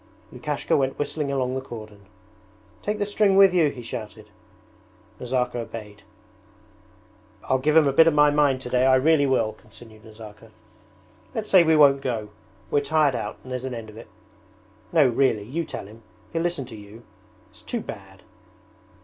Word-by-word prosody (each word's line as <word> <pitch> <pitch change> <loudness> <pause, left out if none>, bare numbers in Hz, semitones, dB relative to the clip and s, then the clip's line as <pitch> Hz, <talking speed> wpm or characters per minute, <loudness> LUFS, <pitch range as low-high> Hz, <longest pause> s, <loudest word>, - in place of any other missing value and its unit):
Lukashka - - -2
went 135 -1 0
whistling 145 0 -3
along 130 -2 -1
the 130 - -3
cordon. 110 -5 -11 0.7
'Take 210 +1 -2
the 205 - -1
string 205 -1 +2
with 195 -2 +7
you,' 165 -5 +3
he 125 -3 -9
shouted. 110 -2 -8 0.9
Nazirka 125 -1 -2
obeyed. 110 -3 -8 1.4
'I'll 130 - 0
give 150 +4 +2
him 155 -3 +5
a 135 - +1
bit 165 +4 +6
of 165 - +4
my 150 0 +5
mind 145 -3 +2
today, 125 0 +1
I 130 - +5
really 145 +2 +3
will,' 120 -5 +1
continued 110 0 -17
Nazarka. 110 0 -13 0.9
'Let's 220 -2 -4
say 185 - +8
we 160 -1 +3
won't 140 -2 +5
go; 115 -6 -3 0.4
we're 145 - +3
tired 150 -1 +2
out 110 -3 -5
and 130 - -11
there's 125 0 -4
an 130 -2 -4
end 110 -2 -8
of 105 - -15
it! 115 - -11 0.8
No, 155 -5 +5
really, 120 -3 +1
you 155 +10 -4
tell - - -7
him, 110 +3 -14 0.3
he'll 165 - -1
listen 170 -5 -2
to 120 -2 -11
you. 105 +2 -13 0.5
It's - - -17
too - - -4
bad!' - - -11
130 Hz, 175 wpm, -24 LUFS, 115-150 Hz, 1.4 s, say